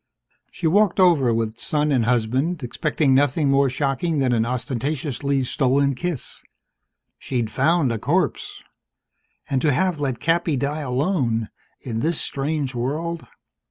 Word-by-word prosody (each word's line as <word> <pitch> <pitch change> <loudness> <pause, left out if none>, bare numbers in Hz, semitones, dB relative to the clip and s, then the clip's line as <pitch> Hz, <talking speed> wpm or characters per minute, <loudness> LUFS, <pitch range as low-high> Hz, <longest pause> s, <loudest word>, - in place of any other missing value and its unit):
She'd 185 - -6
walked 200 +1 +3
over 165 -10 +4
with 115 0 -2
son 150 0 0
and 125 -5 +2
husband, 130 +7 0
expecting 145 +2 0
nothing 140 +1 +2
more 140 0 +3
shocking 140 +5 -1
than 130 -3 +2
an 115 -1 +1
ostentatiously 135 +3 -2
stolen 135 +2 +1
kiss. 165 +1 -4 0.8
She'd 120 -4 -2
found 150 -1 +2
a 115 - -2
corpse. 160 - -1 0.8
And 135 -2 0
to 155 - +3
have 180 +3 0
let 135 -5 -2
Cappy 165 +2 +1
die 145 +4 -2
alone, 125 - 0 0.3
in 115 -3 -3
this 160 +5 0
strange 140 -1 -2
world 155 +7 -3
140 Hz, 135 wpm, -22 LUFS, 125-155 Hz, 0.8 s, over